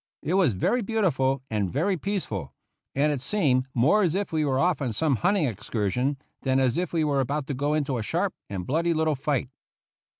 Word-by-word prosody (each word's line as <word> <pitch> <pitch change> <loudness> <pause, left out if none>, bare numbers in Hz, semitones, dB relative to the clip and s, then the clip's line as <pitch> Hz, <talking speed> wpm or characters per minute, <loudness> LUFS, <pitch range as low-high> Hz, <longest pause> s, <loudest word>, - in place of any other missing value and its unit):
It 165 - -1
was 185 - +4
very 240 - +1
beautiful 145 - +1
and 105 -4 0
very 180 +8 +1
peaceful, 110 - -4 0.4
and 145 +2 +3
it 140 -4 -2
seemed 135 -6 +1
more 145 - +4
as 175 -4 +1
if 200 -3 -2
we 155 -1 +2
were 135 -3 +1
off 170 +2 +2
on 125 -5 -1
some 140 +3 +1
hunting 185 - +2
excursion 125 +3 -1 0.2
than 130 -1 +2
as 130 -3 +2
if 180 -1 -1
were 150 -4 +1
about 140 +2 -1
to - - 0
go 145 +3 0
into 140 -5 -1
a - - -2
sharp 105 - -1 0.2
and 95 -3 -4
bloody 165 +4 +1
little 160 0 +2
fight. 135 -2 -1
145 Hz, 200 wpm, -26 LUFS, 130-170 Hz, 0.4 s, was